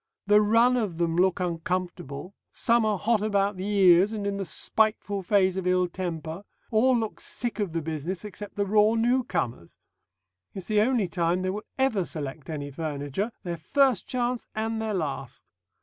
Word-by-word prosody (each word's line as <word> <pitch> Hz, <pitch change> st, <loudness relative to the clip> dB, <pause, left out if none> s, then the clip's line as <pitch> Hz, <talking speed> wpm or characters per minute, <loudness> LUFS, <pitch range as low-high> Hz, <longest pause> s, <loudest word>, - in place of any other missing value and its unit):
The 210 Hz, +1 st, +5 dB
run 230 Hz, +4 st, +4 dB
of 205 Hz, -8 st, -2 dB
them 165 Hz, -1 st, 0 dB
look 185 Hz, +2 st, +2 dB
uncomfortable; 175 Hz, -2 st, -3 dB, 0.2 s
some 230 Hz, -1 st, +2 dB
are 210 Hz, -2 st, +1 dB
hot 220 Hz, +2 st, +1 dB
about 205 Hz, -1 st, +1 dB
the 190 Hz, +2 st, -4 dB
ears 195 Hz, -1 st, +5 dB
and 210 Hz, -2 st, -3 dB
in 200 Hz, 0 st, -1 dB
the 195 Hz, -, -3 dB
spiteful 205 Hz, +3 st, 0 dB
phase 190 Hz, 0 st, +2 dB
of 185 Hz, -1 st, -2 dB
ill 180 Hz, 0 st, +3 dB
temper; 170 Hz, -1 st, -5 dB, 0.3 s
all 245 Hz, +3 st, +4 dB
look 220 Hz, -2 st, -3 dB
sick 240 Hz, -2 st, -4 dB
of 200 Hz, -5 st, -1 dB
the 165 Hz, -1 st, -2 dB
business 160 Hz, +5 st, -4 dB
except 205 Hz, 0 st, -8 dB
the 200 Hz, -, 0 dB
raw 210 Hz, +2 st, +4 dB
new 240 Hz, +3 st, +2 dB
comers. 115 Hz, -, -4 dB, 0.8 s
It's 190 Hz, -2 st, -6 dB
the 210 Hz, -1 st, +4 dB
only 230 Hz, -3 st, +2 dB
time 175 Hz, +1 st, 0 dB
they 185 Hz, -, 0 dB
will 210 Hz, +2 st, -6 dB
ever 265 Hz, -8 st, +2 dB
select 150 Hz, -3 st, -6 dB
any 145 Hz, -2 st, -4 dB
furniture, 150 Hz, -, -3 dB
their 175 Hz, -2 st, -4 dB
first 260 Hz, -, +2 dB
chance 245 Hz, -1 st, -2 dB
and 220 Hz, +1 st, -2 dB
their 220 Hz, -2 st, -2 dB
last. 135 Hz, -6 st, -5 dB
195 Hz, 180 wpm, -26 LUFS, 170-215 Hz, 0.8 s, The